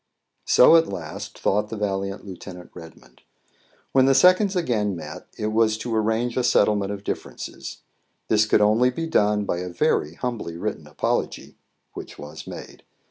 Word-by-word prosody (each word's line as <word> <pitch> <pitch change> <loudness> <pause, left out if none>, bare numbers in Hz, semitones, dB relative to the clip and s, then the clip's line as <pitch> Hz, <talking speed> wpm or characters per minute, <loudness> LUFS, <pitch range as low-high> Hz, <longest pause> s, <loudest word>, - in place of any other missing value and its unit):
So, 165 +6 +7
at 165 0 +3
last, 80 -3 -7
thought 105 +2 0
the 110 - -5
valiant 100 -1 -3
Lieut. 95 -1 -10 0.3
Redmond. 80 -1 -14 0.7
When 130 0 +4
the 135 - +4
seconds 185 +4 +5
again 110 - 0
met, 85 - -9
it 105 0 -2
was 110 0 +2
to 115 +1 -3
arrange 110 +2 0
a 125 - +2
settlement 105 -4 +2
of 100 -1 -6
differences. - - -6 0.5
This 105 -1 +3
could 105 - +3
only 110 +4 +4
be 165 +6 -4
done 105 -9 +2
by 90 - -2
a 90 0 -5
very 80 -2 0
humbly 115 -9 -4
written - - -4
apology, - - -2 0.4
which - - -9
was 75 0 -10
made. - - -9
105 Hz, 160 wpm, -23 LUFS, 100-125 Hz, 0.7 s, So